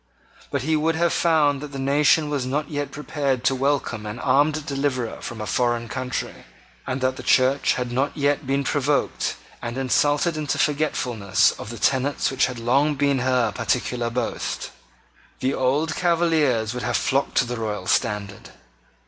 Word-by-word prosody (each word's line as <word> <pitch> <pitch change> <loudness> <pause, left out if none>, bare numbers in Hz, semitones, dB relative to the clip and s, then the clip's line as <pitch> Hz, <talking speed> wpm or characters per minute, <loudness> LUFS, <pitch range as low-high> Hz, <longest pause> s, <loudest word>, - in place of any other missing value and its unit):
But 140 -3 -2
he 160 +2 +1
would 160 +1 +1
have 170 0 +1
found 150 -4 +2
that 150 -1 -8
the - - -5
nation 145 +3 +3
was 140 -3 -1
not 140 +5 -2
yet 145 -1 -2
prepared 140 -4 -2
to - - +3
welcome 130 -5 -1
an 105 +2 -5
armed 145 +3 +2
deliverer 135 -5 -2
from 115 - -7
a 105 - -4
foreign 120 0 0
country, 130 0 -4 0.4
and 130 +1 -2
that 130 0 0
the - - -6
Church 130 +2 +3
had 125 -1 -3
not 135 +5 -1
yet 145 -2 0
been 140 +1 +1
provoked 145 +1 0 0.3
and 120 +1 -5
insulted 145 +5 +1
into 150 -2 -1
forgetfulness 120 -10 +1
of - - -9
the 120 - -7
tenet 135 +3 +1
which 135 - +2
had 125 -2 -6
long 135 +6 +2
been 140 -1 +1
her 125 -3 +1
peculiar 120 +2 -1
boast. 125 +2 -3 0.7
The 130 +1 0
old 145 +5 +1
Cavaliers 160 -10 +2
would 125 - -4
have 120 -1 0
flocked 135 +1 0
to 125 - +4
the 120 0 -4
royal 105 -4 -3
standard. 105 -1 -1
135 Hz, 170 wpm, -23 LUFS, 120-145 Hz, 0.7 s, to